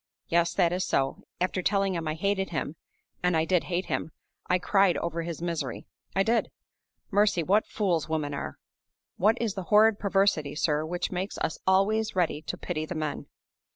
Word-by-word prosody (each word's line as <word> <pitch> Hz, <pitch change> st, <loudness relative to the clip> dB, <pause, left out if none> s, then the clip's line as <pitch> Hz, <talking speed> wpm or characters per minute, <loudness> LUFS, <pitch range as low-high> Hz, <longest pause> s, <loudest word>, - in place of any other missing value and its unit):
Yes, 170 Hz, 0 st, +2 dB
that 170 Hz, 0 st, +3 dB
is 185 Hz, +1 st, 0 dB
so. 135 Hz, -6 st, 0 dB, 0.2 s
After 185 Hz, +1 st, 0 dB
telling 195 Hz, 0 st, +1 dB
him 165 Hz, -2 st, -3 dB
I 155 Hz, -, -1 dB
hated 195 Hz, +3 st, 0 dB
him 155 Hz, -2 st, -3 dB, 0.5 s
(and 180 Hz, -2 st, +2 dB
I 160 Hz, -, +2 dB
did 180 Hz, 0 st, +2 dB
hate 180 Hz, +1 st, -1 dB
him), -, -, -2 dB, 0.4 s
I 180 Hz, -, +3 dB
cried 195 Hz, 0 st, +3 dB
over 170 Hz, 0 st, -2 dB
his 170 Hz, 0 st, -5 dB
misery; 170 Hz, -2 st, -3 dB, 0.3 s
I 195 Hz, -, +4 dB
did! 230 Hz, +3 st, +1 dB, 0.6 s
Mercy, 200 Hz, -3 st, +3 dB
what 200 Hz, +6 st, +2 dB
fools 175 Hz, -7 st, 0 dB
women 150 Hz, -2 st, -1 dB
are! 140 Hz, -, -5 dB, 0.6 s
What 215 Hz, +5 st, +3 dB
is 225 Hz, -4 st, -1 dB
the 190 Hz, -2 st, -5 dB
horrid 215 Hz, +2 st, +5 dB
perversity, 195 Hz, -7 st, +1 dB
sir, 150 Hz, 0 st, +1 dB
which 175 Hz, +1 st, -2 dB
makes 185 Hz, +2 st, -3 dB
us -, -, -2 dB
always 205 Hz, +3 st, +2 dB
ready 170 Hz, -4 st, +1 dB
to 180 Hz, -, -5 dB
pity 155 Hz, -3 st, -3 dB
the 180 Hz, -, -5 dB
men? 155 Hz, -2 st, -3 dB
180 Hz, 185 wpm, -28 LUFS, 160-195 Hz, 0.6 s, horrid